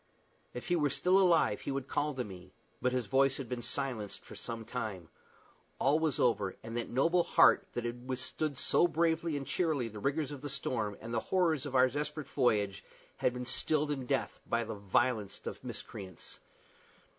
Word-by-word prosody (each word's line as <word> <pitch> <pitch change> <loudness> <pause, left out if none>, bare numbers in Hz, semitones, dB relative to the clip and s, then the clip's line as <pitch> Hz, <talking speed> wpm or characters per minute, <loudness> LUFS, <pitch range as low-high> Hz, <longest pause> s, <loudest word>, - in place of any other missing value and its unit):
If 125 - -6
he 175 - +3
were 150 -4 +2
still 180 +7 +3
alive 170 - +4
he - - -5
would 135 -1 -2
call 150 -1 -1
to 130 - -1
me; 95 -3 -11 0.3
but 125 +1 +2
his 125 -2 0
voice 135 +5 +3
had 135 - -5
been 125 0 -4
silenced 120 -4 -2
for - - -10
some 115 -1 -4
time. 105 -9 -5 0.7
All 145 +4 +3
was 160 -4 0
over, 105 -6 +2
and 115 +1 -6
that 120 - -2
noble 165 +8 +3
heart - - +5
that 120 - -3
had 120 +1 -5
withstood 140 +2 -1
so 175 - +3
bravely 165 -1 +1
and 140 - -5
cheerily 150 -9 0
the 105 -1 -8
rigors 140 +5 -1
of 140 -3 -7
the 145 - -4
storm, 115 -7 -2
and 115 +1 -6
the 115 - +2
horrors 160 -1 +1
of 135 - -5
our 130 0 +6
desperate 150 +1 -4
voyage, 105 -9 +1 0.3
had - - +2
been 125 0 -4
stilled 150 +3 +3
in 135 -3 -3
death 135 -3 -1
by 115 0 +1
the 110 0 -5
vilest 105 +2 0
of - - -6
miscreants. 95 -4 -7
130 Hz, 190 wpm, -32 LUFS, 115-150 Hz, 0.7 s, our